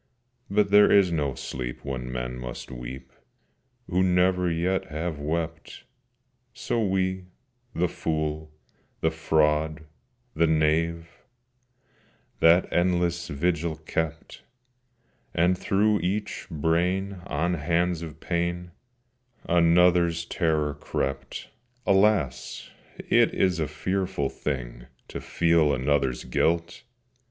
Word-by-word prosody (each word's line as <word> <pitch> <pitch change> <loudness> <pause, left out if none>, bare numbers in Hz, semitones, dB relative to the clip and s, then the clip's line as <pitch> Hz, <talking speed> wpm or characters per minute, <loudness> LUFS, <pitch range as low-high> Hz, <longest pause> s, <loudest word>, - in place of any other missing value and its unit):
But 100 0 +2
there 105 0 +7
is 95 -3 +5
no 75 -5 -1
sleep 60 0 -6
when 65 -2 -4
men 60 0 -4
must 60 +1 -7
weep 60 +1 -8 0.8
Who 90 0 +1
never 90 0 +3
yet 90 +3 0
have 80 -1 -4
wept: 80 +2 -4 0.7
So 115 -1 -1
we—the 95 +3 -3
fool, 80 -1 -3 0.5
the 80 - +2
fraud, 80 -1 +1 0.5
the 85 +1 +2
knave— 80 +2 +1 1.3
That 85 +2 +5
endless 85 -1 +1
vigil 85 +2 -1
kept, 80 +1 -4 0.9
And 90 +2 +3
through 105 +3 +2
each 100 +4 -3
brain 90 +5 0
on 85 +5 0
hands 85 +2 0
of 80 -2 -8
pain 85 +1 -2 0.8
Another's 85 0 +4
terror 80 -5 0
crept. 70 -1 -4 0.3
Alas! 95 - +1 0.3
it - - +2
is 90 -3 +2
a 80 - 0
fearful 90 -1 -2
thing - - -5 0.2
To - - -6
feel 85 -3 +2
another's 65 -1 0
guilt! 85 0 0
85 Hz, 100 wpm, -26 LUFS, 75-90 Hz, 1.3 s, there